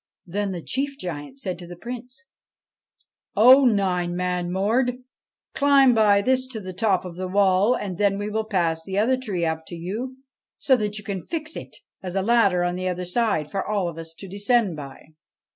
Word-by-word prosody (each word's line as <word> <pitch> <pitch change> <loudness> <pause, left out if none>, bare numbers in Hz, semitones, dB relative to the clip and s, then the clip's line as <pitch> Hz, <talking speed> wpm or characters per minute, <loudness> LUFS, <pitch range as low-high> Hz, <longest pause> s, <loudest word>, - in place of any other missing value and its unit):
Then 200 +3 -2
the 175 -3 -5
chief 275 +1 -2
giant 170 - -7
said 185 -5 -4
to 175 - -9
the 175 - -9
Prince: 245 +6 -8 1.1
'O 260 +5 +8
Nine 185 -6 +1
Man 180 -1 -1
Mord, 235 +7 +1 0.6
climb 280 -3 +5
by 205 -3 +4
this 260 +2 +1
to 245 -4 -6
the 185 -2 -7
top 190 -1 +1
of 175 -1 -8
the 185 0 -3
wall, 195 +4 +3
and 185 -4 -5
then 200 -1 +2
we 205 +1 -3
will 220 +1 -2
pass 170 -6 0
the 190 +3 -4
other 230 +5 +3
tree 205 -10 -2
up 160 0 -2
to 175 - -7
you 220 +10 -5 0.4
so 265 - +3
that 210 -3 -2
you 210 - -8
can 195 -2 -4
fix 315 - -5
it - - -8 0.2
as 185 -1 -6
a 195 - +1
ladder 200 -5 +3
on 175 0 -1
the 185 0 -2
other 180 0 -2
side 180 -6 0
for 195 - -1
all 205 -4 -1
of 165 -1 -6
us 165 0 -7
to 195 - -9
descend 205 0 +1
by.' 145 +1 -10
200 Hz, 200 wpm, -24 LUFS, 180-235 Hz, 1.1 s, O